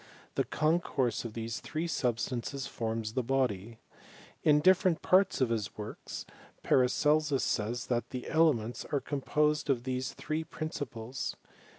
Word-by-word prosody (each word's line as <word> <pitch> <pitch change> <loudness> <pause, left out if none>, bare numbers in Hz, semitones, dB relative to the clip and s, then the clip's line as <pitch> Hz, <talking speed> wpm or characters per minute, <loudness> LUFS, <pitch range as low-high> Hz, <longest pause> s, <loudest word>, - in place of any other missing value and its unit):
The - - +1
concourse 155 -7 +1
of 115 - -5
these 115 0 -4
three 160 +2 -3
substances 130 -2 -1
forms 110 -1 -3
the 130 - +1
body. 115 -4 -1 0.6
In 150 -1 +5
different 185 +1 +4
parts 185 -4 +4
of 130 - +3
his 110 -4 -2
works, 105 0 -6 0.4
Paracelsus 145 +2 +3
says, 115 +2 -1
that 120 -1 -1
the 125 -1 -5
elements 145 -8 +2
are 145 - 0
com 140 +1 -4
posed 150 +1 +1
of 125 -3 +2
these 130 0 -2
three 155 +1 -2
principles. 135 -7 -5
130 Hz, 140 wpm, -31 LUFS, 115-150 Hz, 0.6 s, In